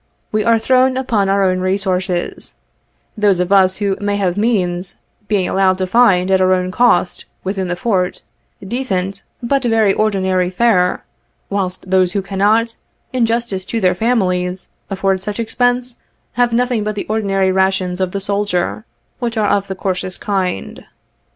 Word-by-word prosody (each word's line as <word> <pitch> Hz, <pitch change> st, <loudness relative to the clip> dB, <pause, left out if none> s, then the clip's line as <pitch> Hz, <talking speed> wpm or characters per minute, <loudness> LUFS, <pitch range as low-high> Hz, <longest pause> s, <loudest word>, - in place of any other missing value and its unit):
We 215 Hz, 0 st, +1 dB
are 230 Hz, +1 st, +4 dB
thrown 255 Hz, +3 st, +2 dB
upon 220 Hz, -7 st, 0 dB
our 195 Hz, 0 st, +2 dB
own 185 Hz, -1 st, +1 dB
resources 185 Hz, -1 st, -2 dB, 0.3 s
— -, -, -45 dB
those 205 Hz, -4 st, +2 dB
of 180 Hz, +1 st, -1 dB
us 190 Hz, -1 st, +5 dB
who 200 Hz, -2 st, -1 dB
may 205 Hz, 0 st, 0 dB
have 185 Hz, -3 st, 0 dB
means, 190 Hz, -5 st, 0 dB, 0.3 s
being 195 Hz, -4 st, +1 dB
allowed 190 Hz, -1 st, +2 dB
to 190 Hz, -, -1 dB
find, 190 Hz, -3 st, +3 dB
at 190 Hz, 0 st, +3 dB
our 185 Hz, 0 st, +4 dB
own 185 Hz, 0 st, -1 dB
cost, 185 Hz, -5 st, +2 dB, 0.2 s
within 190 Hz, -1 st, -2 dB
the 175 Hz, -, -2 dB
Fort, 180 Hz, -2 st, -1 dB, 0.4 s
decent, 195 Hz, -5 st, -2 dB, 0.2 s
but 275 Hz, +3 st, +1 dB
very 225 Hz, -4 st, +3 dB
ordinary 190 Hz, -4 st, +1 dB
fare, 185 Hz, -2 st, +2 dB, 0.5 s
whilst 190 Hz, -1 st, -3 dB
those 185 Hz, -1 st, +3 dB
who 200 Hz, -, -1 dB
cannot, 210 Hz, +4 st, +1 dB, 0.4 s
in 245 Hz, -3 st, +2 dB
justice 230 Hz, -5 st, -2 dB
to 230 Hz, -, -2 dB
their 185 Hz, -3 st, +3 dB
families, 180 Hz, -4 st, -1 dB, 0.2 s
afford 195 Hz, -1 st, 0 dB
such 205 Hz, +3 st, -5 dB
expense, 245 Hz, +1 st, 0 dB, 0.3 s
have 245 Hz, -1 st, +1 dB
nothing 245 Hz, -2 st, +1 dB
but 215 Hz, 0 st, -3 dB
the 205 Hz, -, -4 dB
ordinary 195 Hz, -3 st, +1 dB
rations 190 Hz, -1 st, 0 dB
of 185 Hz, -1 st, 0 dB
the 200 Hz, -, -3 dB
soldier, 200 Hz, +1 st, -1 dB, 0.3 s
which 235 Hz, -2 st, -3 dB
are 210 Hz, -2 st, +2 dB
of 200 Hz, -1 st, +1 dB
the 190 Hz, -, -4 dB
coarsest 185 Hz, -1 st, -3 dB
kind. 190 Hz, -, -3 dB
195 Hz, 165 wpm, -17 LUFS, 185-220 Hz, 0.5 s, us